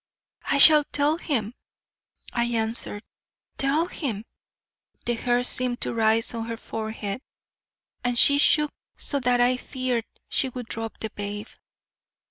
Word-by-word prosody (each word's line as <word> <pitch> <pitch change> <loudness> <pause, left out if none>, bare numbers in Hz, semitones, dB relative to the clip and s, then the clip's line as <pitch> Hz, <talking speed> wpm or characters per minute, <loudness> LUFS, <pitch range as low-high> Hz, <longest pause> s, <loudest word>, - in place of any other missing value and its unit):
"I - - +1
shall 300 +1 +8
tell 295 +3 -1
him," 235 -10 -2 0.8
I 235 -1 0
answered. 225 -2 +3 0.5
"Tell 285 +5 +1
him!" 235 - -5 0.8
The 240 - 0
hair 245 +1 0
seemed 250 0 +2
to - - -1
rise 225 0 +2
on 230 -1 -5
her 230 0 -5
forehead 220 -1 -6 0.8
and 245 -1 -1
she 280 +3 +6
shook 300 0 +4 0.2
so 285 - -2
that 250 -1 +1
I 245 +1 +3
feared 250 -3 -3 0.2
she 265 - +1
would 250 -1 -7
drop 225 0 -6
the 220 - -5
babe. 205 +1 -6
240 Hz, 135 wpm, -24 LUFS, 225-270 Hz, 0.8 s, shall